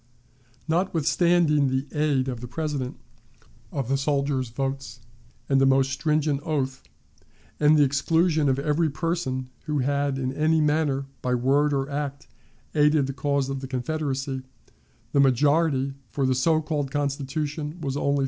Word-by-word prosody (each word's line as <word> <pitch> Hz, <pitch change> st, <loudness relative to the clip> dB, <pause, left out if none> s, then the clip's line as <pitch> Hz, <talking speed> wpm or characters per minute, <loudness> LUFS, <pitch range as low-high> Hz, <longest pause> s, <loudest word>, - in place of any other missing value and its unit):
Notwithstanding 165 Hz, -2 st, +2 dB
the 130 Hz, +1 st, -1 dB
aid 150 Hz, -3 st, +1 dB
of 125 Hz, -3 st, -4 dB
the 125 Hz, -, -6 dB
President, 140 Hz, -1 st, -3 dB, 0.7 s
of 135 Hz, -5 st, -3 dB
the 135 Hz, +1 st, +1 dB
soldiers' 140 Hz, -2 st, 0 dB
votes, 135 Hz, 0 st, -4 dB, 0.5 s
and 135 Hz, -1 st, +3 dB
a -, -, +5 dB
most 135 Hz, 0 st, +3 dB
stringent 150 Hz, 0 st, 0 dB
oath, 140 Hz, -4 st, -2 dB, 0.8 s
and 150 Hz, +1 st, +5 dB
the 145 Hz, -, +6 dB
exclusion 155 Hz, +2 st, +2 dB
of 130 Hz, -, +2 dB
every 150 Hz, +3 st, +1 dB
person 140 Hz, -5 st, -2 dB
who 150 Hz, -1 st, -1 dB
had 140 Hz, 0 st, 0 dB
in 130 Hz, 0 st, -2 dB
any 155 Hz, +3 st, +2 dB
manner, 150 Hz, -2 st, +1 dB, 0.2 s
by 125 Hz, 0 st, 0 dB
word 140 Hz, +4 st, +2 dB
or 135 Hz, -1 st, 0 dB
act, 140 Hz, -1 st, -4 dB, 0.5 s
aided 150 Hz, -1 st, +4 dB
the 135 Hz, -, -4 dB
cause 140 Hz, -1 st, 0 dB
of 135 Hz, 0 st, -3 dB
the 135 Hz, -, -6 dB
Confederacy, 135 Hz, 0 st, -2 dB, 0.7 s
the 140 Hz, -, +2 dB
majority 140 Hz, +1 st, +3 dB, 0.2 s
for 135 Hz, +5 st, -1 dB
the 130 Hz, -, +2 dB
so 155 Hz, +5 st, +2 dB
called 150 Hz, -3 st, -2 dB
Constitution 145 Hz, +3 st, -3 dB
was 140 Hz, -4 st, -3 dB
only 140 Hz, 0 st, +1 dB
375. -, -, +1 dB
140 Hz, 150 wpm, -25 LUFS, 135-150 Hz, 0.8 s, the